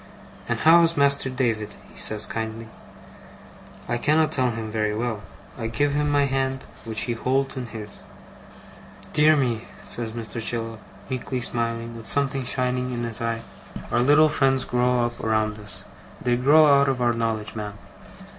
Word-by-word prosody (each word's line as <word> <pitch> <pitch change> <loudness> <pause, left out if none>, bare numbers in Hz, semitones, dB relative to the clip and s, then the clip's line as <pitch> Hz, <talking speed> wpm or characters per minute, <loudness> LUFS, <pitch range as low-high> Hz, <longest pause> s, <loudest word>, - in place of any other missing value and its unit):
'And - - +1
how 165 +2 +7
is 165 -1 +2
Master 140 -1 +3
David?' 115 -5 -1 0.2
he - - -19
says, 110 0 0
kindly. 110 0 -5 1.2
I 120 - -1
cannot 155 +4 +3
tell 130 -2 +2
him 110 -2 -4
very 105 -1 0
well. 110 -2 -2 0.4
I 115 - -2
give 145 +5 0
him 150 0 +1
my 145 -1 +3
hand, 135 -1 -1 0.2
which 110 -1 -2
he 120 - -1
holds 135 +4 0
in 125 -2 -4
his. 110 -3 -9 1.1
'Dear 155 +1 +5
me!' 120 -5 0 0.2
says 115 -2 -3
Mr. 115 0 -5
Chillip, 115 -1 -3 0.3
meekly 130 0 -3
smiling, 115 -1 -2
with 115 -1 -9
something 135 -2 0
shining 125 0 0
in 120 -1 -3
his 115 0 -2
eye. 115 0 -1 0.5
'Our 120 - +2
little 145 +4 +6
friends 135 -3 +2
grow 125 0 +2
up 120 0 -5
around 110 -1 0
us. 105 -1 -7 0.4
They 120 -1 +1
grow 140 +2 +6
out 140 - +3
of 130 -2 -1
our 120 -1 +2
knowledge, 110 -2 -2
ma'am? 105 -2 -5
120 Hz, 165 wpm, -24 LUFS, 115-135 Hz, 1.2 s, how